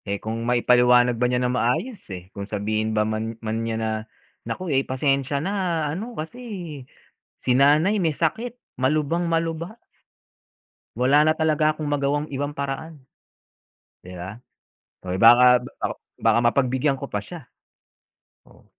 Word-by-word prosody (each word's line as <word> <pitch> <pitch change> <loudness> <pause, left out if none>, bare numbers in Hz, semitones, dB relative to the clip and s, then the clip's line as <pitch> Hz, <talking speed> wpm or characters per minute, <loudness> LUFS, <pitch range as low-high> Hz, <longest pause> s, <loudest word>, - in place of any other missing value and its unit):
Eh, 100 -1 -2
kung 110 +2 -5
maipaliwanag 125 0 +4
ba 125 - +3
niya 125 - +1
ng 125 - 0
maayos, 165 - -1
eh. 90 -1 -9
Kung 100 +1 -7
sabihin 110 +1 -1
ba 105 - +3
man 110 +1 -3
man 110 0 -3
niya 115 -1 -2
na, 110 0 -1 0.6
"Naku, 180 -5 -3
eh, 135 - +3
pasensya 135 +1 0
na 175 -1 -1
ano 225 +8 -6
kasi 160 +11 -6 1.0
si 125 - -1
nanay 150 +10 +4
may 160 -3 +1
sakit. 225 +9 -1 0.2
Malubang-malubha." 165 - 0 1.2
"Wala 140 +4 +5
na 155 0 +3
talaga 155 -1 +3
akong 155 -1 -5
magawang 145 +1 0
ibang 145 +2 -2
paraan," 145 +2 -5 1.1
di 90 - -9
ba? 95 +4 -7 0.7
Oh, 90 - -4
eh, 95 - -2
baka 125 +2 +7
baka 125 - -10 0.3
baka 115 0 +3
mapagbigyan 130 +3 +1
ko 135 - -7
pa 105 - -1
siya. 155 - -10 1.1
Oh. - - -21
135 Hz, 145 wpm, -23 LUFS, 115-155 Hz, 1.2 s, baka